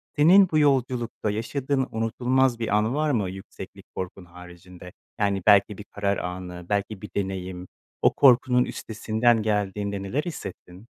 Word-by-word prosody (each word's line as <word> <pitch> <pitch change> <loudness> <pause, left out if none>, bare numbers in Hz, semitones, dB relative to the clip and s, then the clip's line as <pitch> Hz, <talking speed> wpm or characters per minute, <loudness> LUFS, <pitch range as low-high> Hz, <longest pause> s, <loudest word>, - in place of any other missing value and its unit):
Senin 180 +6 +6
bu 155 - +1
yolculukta 125 -6 0
yaşadığın 130 +5 -2
unutulmaz 120 +3 +1
bir 115 - -2
an 110 +5 0
var 155 0 +1
mı, 105 -8 0
yükseklik 95 +1 -10
korkun 95 0 -6
haricinde? 90 +1 -13 0.3
Yani, 100 -2 +1
belki 100 -1 +5
bir 105 - -8
karar 100 -1 -1
anı, 90 0 -6
belki 100 -1 -2
bir 105 - -8
deneyim, 95 -2 -4 0.3
o - - +4
korkunun 125 -1 +4
üstesinden 110 +1 0
geldiğinde 100 -1 -2
neler 130 +10 -2
hissettin? 95 - -8
105 Hz, 140 wpm, -25 LUFS, 95-125 Hz, 0.3 s, Senin